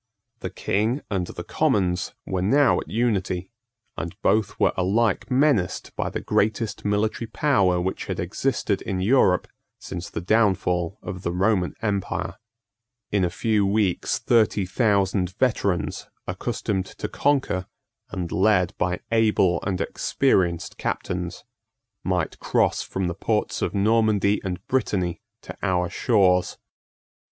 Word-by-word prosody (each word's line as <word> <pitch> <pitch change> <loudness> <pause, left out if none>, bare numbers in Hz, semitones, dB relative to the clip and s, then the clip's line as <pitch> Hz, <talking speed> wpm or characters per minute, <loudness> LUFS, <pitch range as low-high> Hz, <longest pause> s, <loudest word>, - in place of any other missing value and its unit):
The - - -4
King 110 +8 -1
and 90 -3 -1
the - - -7
Commons 90 -3 0
were 95 -1 -2
now 135 +9 +4
at - - -8
unity; 95 -5 -1 0.4
and 90 +4 -6
both 105 +1 +1
were - - +3
alike 100 +4 +1
menaced 125 -9 +1
by - - -1
the - - -4
greatest 110 +1 0
military 105 +2 0
power 105 -9 +2
which 95 +2 -2
had - - -4
existed - - -1
in 95 - -3
Europe 95 -3 +3 0.3
since 85 -1 -7
the - - -4
downfall 90 -2 +1
of 90 0 -6
the 85 - -2
Roman 95 0 +1
empire. 100 -3 -2 0.7
In 100 -2 +2
a 90 - +2
few 105 +3 +1
weeks 100 -2 +1
thirty 110 -4 +2
thousand 95 -3 +1
veterans, 100 -8 0 0.2
accustomed 95 -2 -2
to - - -6
conquer, 105 -8 0 0.4
and 90 -3 -4
led 95 -1 +3
by 90 0 0
able 105 -6 +3
and 95 -3 -1
experienced 90 -11 0
captains, 90 -1 -3 0.6
might 90 -3 -1
cross - - +1
from 95 - -3
the 85 - -1
ports 105 +4 -1
of - - -1
Normandy 105 -1 +3
and 90 -2 -4
Brittany 95 -9 -1 0.2
to - - -8
our 90 -3 0
shores. 95 -7 +2
100 Hz, 130 wpm, -24 LUFS, 90-110 Hz, 0.7 s, now